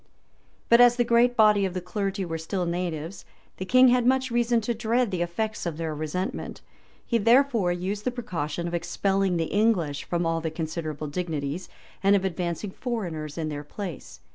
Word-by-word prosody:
But 235 +1 +6
as 245 0 +7
the 240 - +2
great 240 +1 +3
body 210 -2 +5
of 190 -1 -2
the - - 0
clergy 195 +1 -3
were 165 -1 -4
still 180 +3 -2
natives, 170 0 -3 0.3
the 185 - -4
king 255 +5 +6
had 245 0 +3
much 260 +1 +2
reason 240 0 +2
to 235 +2 -1
dread 235 0 0
the 180 -2 -2
effects 180 +4 -2
of 160 -3 -4
their 160 -1 -3
resentment; 155 +5 -4 0.4
he 235 - +1
therefore 230 -4 +4
used 190 +4 -3
the 250 - +1
precaution 175 -9 -4
of 170 - -5
expelling 190 +2 0
the 165 - +1
English 185 -10 +1
from 175 -1 -1
all 165 0 0
the 160 - -2
considerable 160 -1 -4
dignities, 155 0 -3 0.3
and 200 +1 +5
of 195 -1 +1
advancing 180 +2 -3
foreigners 175 - -4
in 160 -2 -2
their 145 -1 -5
place. 175 0 -8
185 Hz, 185 wpm, -26 LUFS, 165-225 Hz, 0.4 s, as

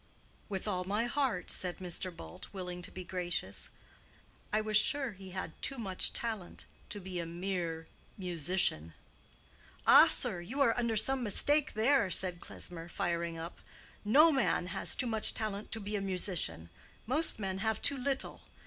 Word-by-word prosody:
"With 195 0 -4
all 185 -3 -1
my 205 +5 -1
heart," 250 -6 -1
said 180 -1 -1
Mr. 185 0 -3
Bult, 80 0 -10
willing 180 -2 -6
to - - -5
be 185 - -7
gracious. 175 - -4 0.8
"I 215 - +2
was 215 0 -2
sure 270 +4 +3
he 190 -1 -12
had 185 0 -5
too 275 - +2
much 195 -6 +4
talent 220 -6 -4 0.2
to 205 - -4
be 185 -2 -6
a 170 - -3
mere 170 -2 -4 0.3
musician." 170 - 0 0.9
"Ah, - - +8
sir, 175 - +1
you 245 +11 -6
are 250 -5 +4
under 235 -2 0
some 265 +4 +2
mistake 290 +7 +2
there," 225 -1 +2
said 180 0 +1
Klesmer, 170 -1 -7
firing 170 -2 -2
up. 165 +2 -8 0.4
"No 295 +10 +6
man 265 - +1
has 195 - -1
too - - 0
much 220 -2 +6
talent 215 -1 -4
to 225 - -1
be 205 0 -4
a 200 - -1
musician. 175 - -2 0.3
Most 300 +8 +2
men 190 -2 -3
have 220 +1 -1
too 280 - +4
little. 270 +1 -2
195 Hz, 165 wpm, -32 LUFS, 175-225 Hz, 0.9 s, Ah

